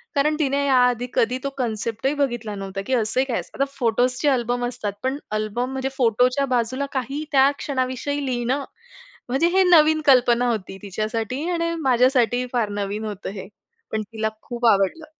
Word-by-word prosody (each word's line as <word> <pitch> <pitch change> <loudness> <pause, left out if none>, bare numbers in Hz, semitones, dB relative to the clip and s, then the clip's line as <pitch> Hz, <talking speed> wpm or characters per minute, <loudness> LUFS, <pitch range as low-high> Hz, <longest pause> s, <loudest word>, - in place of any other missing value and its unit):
कारण 300 +2 +2
तिने 280 -1 +1
या 275 -2 +3
आधी 245 0 -1
कधी 245 +3 +1
तो 275 - -1
कन्सेप्टही 230 +2 -1
बघितला 240 -7 -2
नव्हता 195 0 -5
की 265 - -1
असं 225 0 +1
ही 265 - +3
काय 250 -4 -1
असतं. - - -10
आता - - +4
फोटोसचे 250 +3 +1
अल्बम 245 -2 0
असतात 225 -5 -4
पण 265 +2 0 0.2
अल्बम, 215 +4 -2
म्हणजे 265 0 -2
फोटोच्या 250 +3 +2
बाजूला 255 +4 -1
काही 270 +3 -3
त्या 270 0 +5
क्षणाविषयी 275 +1 -2
लिहिणं? 255 +2 -1 0.7
म्हणजे 270 +7 +2
हे 385 - +6
नवीन 315 -3 +5
कल्पना 245 -2 +4
होती 190 -4 -3
तिच्यासाठी 220 +6 -3
आणि 335 -1 -1
माझ्यासाठी 250 -2 +3
ही 250 0 -2
फार 235 -4 +1
नवीन 205 +2 -3
होतं 205 -2 -5
हे. 195 -2 -8 0.4
पण 220 - -1
तिला 220 0 -1
खूप 240 -1 -4
आवडलं. 200 - +2
250 Hz, 175 wpm, -23 LUFS, 225-275 Hz, 0.7 s, हे